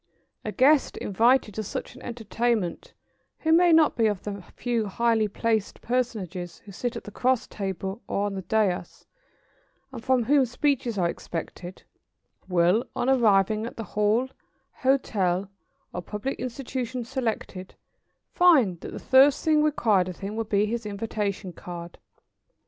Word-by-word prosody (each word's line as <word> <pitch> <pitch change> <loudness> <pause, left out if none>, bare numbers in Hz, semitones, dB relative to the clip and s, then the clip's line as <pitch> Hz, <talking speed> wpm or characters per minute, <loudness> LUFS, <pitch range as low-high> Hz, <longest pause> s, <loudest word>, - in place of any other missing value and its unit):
] - - -50
A - - -3
guest 280 +2 +3
invited 225 +2 +2
to 220 - -3
such 210 - -5
an - - -14
entertainment 230 -4 -2 0.5
who 320 - +1
may 345 +1 +6
not 320 -2 +5
be 225 -2 +3
of 205 -3 -2
the 200 -1 -5
few 235 -3 -1
highly 225 +1 +1
placed 220 0 -1
personages 200 -8 -2
who 200 - -10
sit 240 +6 -3
at 230 - -6
the 210 - -9
cross 255 +3 +1
table 195 +1 -5
or 200 - -1
on 205 - -2
the 190 - -4
daïs, 190 -3 -1 0.9
and 240 -4 -8
from 255 -1 +2
whom 280 +4 +4
speeches 245 -2 0
are 175 -2 +2
expected, 175 +2 -6 0.7
will, 180 +5 +3
on 255 - +1
arriving 215 -3 +3
at - - -10
the 225 - -4
hall, 210 +5 +2 0.5
hotel, 200 -8 0 0.4
or 180 - -3
public 210 +8 -4
institution 250 0 -4
selected, 225 -7 -4 0.6
find 270 - +4
that - - -8
the - - -5
first 270 +2 +4
thing 310 -1 +4
required 220 -11 +2
of 180 - -8
him 200 +2 -4
will 225 - -1
be 205 -1 +2
his 230 +2 -3
invitation 205 -2 -3
card. 170 0 -9
220 Hz, 155 wpm, -26 LUFS, 195-250 Hz, 0.9 s, may